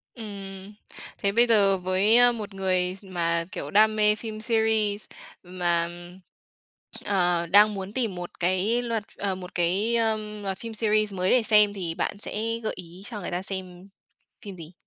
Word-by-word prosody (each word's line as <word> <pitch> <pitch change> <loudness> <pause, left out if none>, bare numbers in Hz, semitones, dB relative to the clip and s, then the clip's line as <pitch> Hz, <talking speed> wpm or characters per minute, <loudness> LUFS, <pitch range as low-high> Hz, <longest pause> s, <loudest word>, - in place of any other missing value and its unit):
Ừm. 195 -3 -9 0.4
Thế 200 - 0
bây 235 +3 +3
giờ 200 -4 +4
với, 185 +5 +3
ơ, 245 0 +7
một 215 -4 -7
người 185 -1 0
s 195 - -15
mà, 170 -3 -1
kiểu, - - -6
đam 215 +1 +4
mê 210 0 +3
phim 215 0 -7
series 220 -2 0 0.4
mà, 175 -2 -1 1.2
ờ, 175 -3 +1
đang 210 +4 +5
muốn 195 +1 -6
tìm 230 -8 -2
một 175 0 -8
cái 185 +7 +1
loạt 230 -3 -2
ờ, 195 -2 -2
một 185 -1 -10
cái, 190 +7 +1
ờm, 215 -2 -1
loạt 195 -1 -3
phim 230 +2 -7
series 215 -1 +1
mới 185 0 -1
để 250 -3 +4
xem 210 -2 +5
thì 175 -5 -4
bạn 200 - -2
sẽ 225 +2 -3
gợi 215 - -1
ý 180 +2 -11
cho 210 -2 -6
người 175 - -5
ta 175 - -2
xem 190 -1 -6 0.6
phim 200 -2 -7
gì? 165 0 -11
200 Hz, 180 wpm, -25 LUFS, 185-215 Hz, 1.2 s, ơ